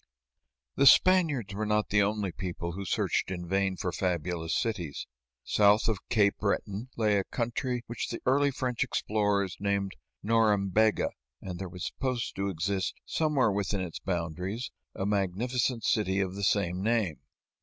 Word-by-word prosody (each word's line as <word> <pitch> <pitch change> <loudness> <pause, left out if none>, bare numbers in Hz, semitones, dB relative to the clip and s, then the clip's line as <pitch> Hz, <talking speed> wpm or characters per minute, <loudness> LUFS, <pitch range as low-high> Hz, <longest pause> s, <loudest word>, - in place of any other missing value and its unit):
The 140 - +5
Spaniards 155 - +5
were 105 +2 -2
not 105 0 +1
the 105 0 +4
only 100 -1 0
people 85 -1 -4
who 95 +3 -6
searched 90 - 0
in 90 -2 -5
vain 95 0 0
for 90 - -2
fabulous 85 -2 -1
cities. 90 - -3 0.4
South 105 +2 +4
of 110 -4 0
Cape 100 -3 +3
Breton 105 +3 -2
lay 105 -3 +3
a - - -1
country 120 +2 -2
which 120 - -4
the 115 - -4
early 140 +2 +4
French 125 -3 -1
explorers 100 -3 0
named 100 -1 -1 0.3
Norembega, 110 -1 +3 0.3
and 90 -2 -7
there 95 -2 -5
was 90 0 -6
supposed 130 -3 -2
to 100 +1 0
exist, 95 +2 -1
somewhere 150 -8 +2
within 100 0 -1
its 90 -3 -5
boundaries, 90 +6 -3 0.2
a 95 - -2
magnificent 110 +5 0
city 100 -4 +1
of 95 -1 -1
the 100 +1 -5
same 95 -2 +1
name. 105 -7 0
100 Hz, 155 wpm, -29 LUFS, 95-115 Hz, 0.4 s, The